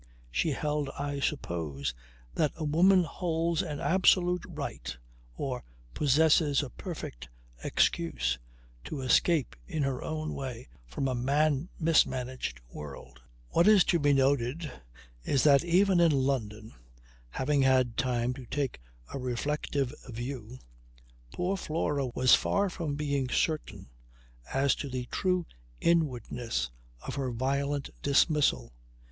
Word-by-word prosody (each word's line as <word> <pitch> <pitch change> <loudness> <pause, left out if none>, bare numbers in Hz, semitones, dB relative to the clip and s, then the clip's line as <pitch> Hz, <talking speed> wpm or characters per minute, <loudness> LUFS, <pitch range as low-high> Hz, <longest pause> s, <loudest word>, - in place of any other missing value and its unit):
She 110 - +1
held, 150 0 -1
I 140 0 -3
suppose, 80 - -2 0.4
that 150 - +1
a 160 - -5
woman 180 +5 +5
holds 165 +1 -1
an 150 -6 -4
absolute 180 -1 +3
right 65 +1 -5 0.4
or - - -3 0.3
possesses 150 0 +3
a 130 - -7
perfect 165 - -7 0.3
excuse 75 -8 +1 0.5
to 145 - -5
escape 135 +3 +2
in 160 -6 -1
her 135 -2 -2
own 155 0 -3
way 130 -3 -6 0.2
from 100 - -2
a 130 - 0
man 145 +5 +1
mismanaged 130 - +1
world. 70 -4 -9 0.3
What 170 - +3
is 210 -4 +7
to 170 - +2
be 145 -1 +3
noted 135 +2 +1 0.5
is 135 - +1
that 140 -1 +6
even 180 +2 +4
in 170 -2 +5
London, 115 -6 -1 0.6
having 140 - +1
had 130 -3 +3
time 125 -1 0
to 125 -2 -10
take 135 - -2 0.3
a - - -3
reflective 135 +1 -2 0.2
view, 120 0 -6 0.7
poor 180 +2 -1
Flora 150 -6 -1
was 125 +1 +3
far 200 -1 +3
from 160 -6 -3
being 140 -3 -1
certain 155 - -1 0.6
as 135 -1 +3
to 140 - -4
the 125 -1 -4
true 180 -2 +1 0.3
inwardness 125 - 0 0.3
of - - -4
her 135 -2 -2
violent 140 +3 -1
dismissal. 145 - +2
140 Hz, 125 wpm, -29 LUFS, 125-160 Hz, 0.7 s, is